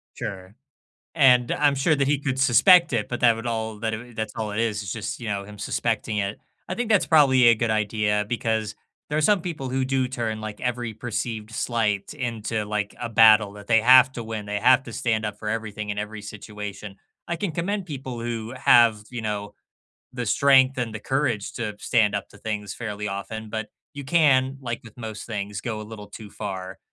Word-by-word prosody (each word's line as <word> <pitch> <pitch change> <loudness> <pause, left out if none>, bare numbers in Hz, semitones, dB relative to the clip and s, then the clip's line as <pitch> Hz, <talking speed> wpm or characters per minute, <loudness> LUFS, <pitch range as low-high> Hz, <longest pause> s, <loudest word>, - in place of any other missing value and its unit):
Sure, 95 +1 -7 0.6
and 125 -5 +5
I'm 145 -1 +2
sure 140 +4 +2
that 140 -1 +1
he 145 +1 +2
could 135 -2 -2
suspect 145 +7 +6
it, 110 -4 0
but 120 - -4
that 120 -2 +5
would 115 +2 -7
all 110 -2 -3
that 110 0 -1
it - - -2
w 120 +1 -11
that's 110 -1 -4
all 110 -2 -3
it 105 - -1
is. 110 -2 -1
It's 95 -2 -5
just, 110 -3 -5
you 115 - -5
know, 100 -1 -2
him 105 +1 -12
suspecting 105 +1 -1
it. 100 +1 -2 0.3
I 185 - -2
think 245 +1 -2
that's 205 -3 +4
probably 135 -5 +5
a 115 - +7
good 115 0 -1
idea 105 -1 +1
because 110 -3 -1 0.3
there 150 - -1
are - - +3
some 200 +5 +3
people 160 -6 -5
who 130 +1 0
do 130 0 0
turn 115 -4 -3
like 110 -1 -7
every 120 -2 -3
perceived 110 -1 -4
slight 110 -1 -1
into 115 -5 -3
like, 105 -1 -3
a 120 - -3
battle 110 -2 +6
that 105 -1 -12
they 115 0 +4
have 130 +3 +7
to 120 - -6
win 110 -2 -6
they 105 0 -2
have 130 +2 +5
to 115 - -9
stand 110 -2 -1
up 105 -1 -5
for 105 - -5
everything 105 -2 -4
in 105 - -4
every 105 0 -5
situation. 105 -1 -8 0.3
I 170 - -2
can 200 +1 -2
commend 190 +4 -2
people 130 -5 -6
who 115 0 -4
have, 115 -4 +5
you 120 - -5
know, 105 -1 -4 0.6
the 125 -1 -3
strength 135 +2 +4
and 115 -3 -2
the 110 - -4
courage 130 -5 -1
to 110 -3 -4
stand 105 -4 +2
up 100 - -3
to - - -16
things 105 -2 -4
fairly 105 -3 -5
often, 105 +2 -6
but 110 -1 -3 0.3
you 140 - -7
can, 135 -3 +3
like 120 -2 -4
with 115 0 -15
most 110 -3 -7
things, 100 -2 -4
go 110 -3 -4
a - - -6
little 105 -1 -10
too 105 +1 -10
far 95 -1 -6
115 Hz, 215 wpm, -24 LUFS, 105-130 Hz, 0.6 s, a